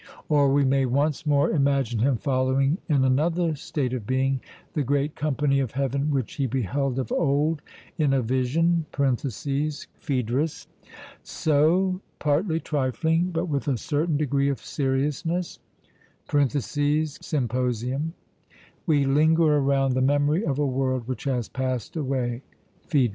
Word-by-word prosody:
Or 145 Hz, -3 st, +4 dB
we 140 Hz, 0 st, +3 dB
may 135 Hz, 0 st, +2 dB
once 145 Hz, +4 st, 0 dB
more 145 Hz, -1 st, +3 dB
imagine 135 Hz, -6 st, +1 dB
him 130 Hz, +2 st, +2 dB
following 135 Hz, -, +1 dB
in 140 Hz, -4 st, +3 dB
another 160 Hz, +5 st, +1 dB
state 135 Hz, -3 st, -3 dB
of 115 Hz, -5 st, -4 dB
being 130 Hz, 0 st, +1 dB, 0.3 s
the 150 Hz, -, 0 dB
great 145 Hz, +2 st, 0 dB
company 145 Hz, -1 st, +1 dB
of 130 Hz, -5 st, -2 dB
heaven 140 Hz, +2 st, -1 dB
which 135 Hz, -5 st, -1 dB
he 140 Hz, -2 st, +1 dB
beheld 130 Hz, +2 st, -1 dB
of 130 Hz, -, -3 dB
old 150 Hz, 0 st, +1 dB, 0.4 s
in 150 Hz, -3 st, +3 dB
a 135 Hz, -2 st, +2 dB
vision 150 Hz, +7 st, +1 dB
(Phaedr.). 140 Hz, 0 st, -1 dB, 0.8 s
So, 175 Hz, +5 st, +1 dB, 0.2 s
'partly 160 Hz, +3 st, +1 dB
trifling, 160 Hz, +5 st, 0 dB
but 170 Hz, 0 st, -1 dB
with 150 Hz, -3 st, -2 dB
a 135 Hz, -4 st, +1 dB
certain 150 Hz, +5 st, 0 dB
degree 140 Hz, -1 st, +1 dB
of 140 Hz, -, -1 dB
seriousness' 150 Hz, +6 st, -2 dB, 0.7 s
(Symp.), 145 Hz, -1 st, 0 dB, 1.3 s
we 145 Hz, -4 st, +3 dB
linger 155 Hz, +3 st, +4 dB
around 135 Hz, -1 st, +2 dB
the 130 Hz, -, +1 dB
memory 145 Hz, +6 st, +2 dB
of 140 Hz, -8 st, -1 dB
a 145 Hz, -, +1 dB
world 130 Hz, -2 st, -1 dB
which 130 Hz, +1 st, -5 dB
has 125 Hz, -4 st, -1 dB
passed 130 Hz, -1 st, -3 dB
away 130 Hz, -5 st, -2 dB, 0.5 s
(Phaedr.). 140 Hz, -8 st, +3 dB
140 Hz, 130 wpm, -25 LUFS, 130-150 Hz, 1.3 s, Or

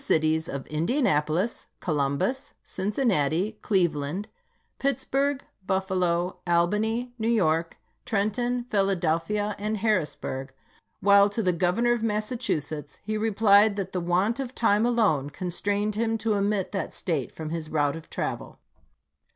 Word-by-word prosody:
cities 160 Hz, +1 st, +1 dB
of 140 Hz, -1 st, -5 dB
Indianapolis, 165 Hz, -, 0 dB
Columbus, 155 Hz, -, -1 dB
Cincinnati, 195 Hz, -, 0 dB
Cleve 180 Hz, -6 st, +2 dB
land, 150 Hz, +8 st, -4 dB, 0.5 s
Pittsburgh, 275 Hz, +1 st, 0 dB, 0.2 s
Buffalo, 185 Hz, -2 st, 0 dB
Albany, 215 Hz, +8 st, +1 dB
New 220 Hz, -, -1 dB
York, 165 Hz, -7 st, +1 dB, 0.3 s
Trenton, 240 Hz, +4 st, 0 dB
Philadelphia, 195 Hz, +1 st, +1 dB
and 215 Hz, +1 st, -1 dB
Harrisburg; 150 Hz, -10 st, -1 dB, 0.5 s
while 200 Hz, 0 st, +6 dB
to 220 Hz, +2 st, -2 dB
the 180 Hz, -1 st, +2 dB
Governor 180 Hz, +8 st, +2 dB
of 240 Hz, -2 st, +1 dB
Massachusetts 210 Hz, -, -2 dB
he 215 Hz, +1 st, -2 dB
replied 215 Hz, -1 st, +4 dB
that 195 Hz, -2 st, -3 dB
the 180 Hz, -, -2 dB
want 185 Hz, +8 st, +1 dB
of 260 Hz, -1 st, -4 dB
time 220 Hz, 0 st, +3 dB
alone 200 Hz, -, +2 dB
constrained 200 Hz, +6 st, -1 dB
him 225 Hz, +1 st, 0 dB
to 220 Hz, 0 st, 0 dB
omit 200 Hz, -1 st, 0 dB
that 195 Hz, -, -3 dB
State 155 Hz, -8 st, -2 dB
from 160 Hz, -1 st, -6 dB
his 165 Hz, -2 st, -3 dB
route 145 Hz, -2 st, +1 dB
of 165 Hz, -, -10 dB
travel. -, -, -4 dB
200 Hz, 125 wpm, -26 LUFS, 165-220 Hz, 0.5 s, while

